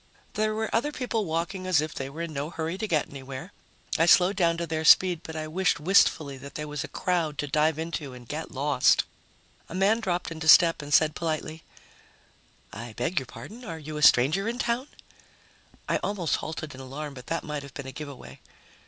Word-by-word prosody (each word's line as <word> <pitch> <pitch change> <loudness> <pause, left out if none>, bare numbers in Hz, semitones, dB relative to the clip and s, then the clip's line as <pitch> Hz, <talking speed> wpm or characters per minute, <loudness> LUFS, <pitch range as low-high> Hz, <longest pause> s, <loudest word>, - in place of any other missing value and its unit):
There 215 0 0
were 220 0 -2
other 265 +7 +1
people 240 -6 -2
walking 175 +3 -3
as 180 -5 +4
if 155 0 -2
they 135 0 -5
were 160 +4 -6
in 165 -2 -5
no 145 +1 -3
hurry 165 0 -3
to 215 +3 -3
get 155 -6 +1
anywhere. 135 +6 -8 0.5
I 165 - +4
slowed 185 +3 +6
down 170 -3 +2
to 170 - -2
their 160 -1 -2
speed, 175 +1 +6
but 160 - -8
I 155 0 -4
wished 180 +2 +1
wistfully 150 -5 +3
that 140 +1 -11
there 150 0 -4
was 150 -1 -4
a - - -6
crowd 170 -5 -1
to 145 - -1
dive 155 +2 +1
into 160 -3 -4
and 120 -1 -13
get 155 +4 -5
lost. 140 -1 +3 0.7
A 170 - -7
man 200 +4 +3
dropped 180 -6 -2
into 160 -1 -5
step 165 0 +7
and 145 0 -8
said 155 +1 +5
politely, 160 -1 -3 1.1
"I 115 +2 -7
beg 145 +10 -1
your 130 - -9
pardon. 230 - -10
Are 165 -8 -6
you 155 0 -8
a - - -4
stranger 150 - +5
in 240 - -4
town?" 245 +2 -1 1.0
I - - +2
almost 190 -5 -1
halted 155 -1 -6
in 130 - -10
alarm, 140 +3 -6
but 125 -1 -11
that 165 - -2
might 150 -1 -4
have 140 0 -12
been 140 -3 -6
a 135 - -6
giveaway. 135 - -9
160 Hz, 210 wpm, -27 LUFS, 145-180 Hz, 1.1 s, step